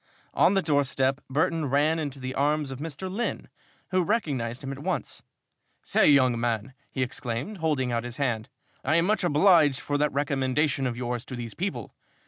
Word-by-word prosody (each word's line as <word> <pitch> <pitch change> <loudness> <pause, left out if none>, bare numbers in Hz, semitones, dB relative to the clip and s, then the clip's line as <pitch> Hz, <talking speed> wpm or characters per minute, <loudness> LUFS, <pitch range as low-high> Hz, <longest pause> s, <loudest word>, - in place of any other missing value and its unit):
On 195 - +4
the 195 - +2
doorstep, 140 -2 +1
Burton 155 +2 +1
ran 150 +4 +2
into 145 -3 -4
the 130 0 -4
arms 145 +1 0
of 135 - -7
Mr. 160 +3 -5
Lynn, 205 +6 -3 0.4
who 185 0 +3
recognized 140 - -1
him 135 - -4
at 135 - -6
once. - - -3 0.6
"Say, - - +3
young 130 -4 +4
man," 120 +1 -1 0.2
he 130 - -1
exclaimed, 125 - -3
holding 145 -6 0
out 115 -1 -1
his 120 0 -6
hand, 120 -6 -1 0.3
"I 150 +4 +2
am 170 0 +4
much 205 -1 +1
obliged 155 -4 +5
for 145 0 -2
that 150 0 +2
recommendation 135 0 0
of 120 -1 -4
yours 120 -1 -3
to 130 - -7
these 120 -2 -6
people! 190 +3 -4
140 Hz, 180 wpm, -27 LUFS, 130-160 Hz, 0.6 s, obliged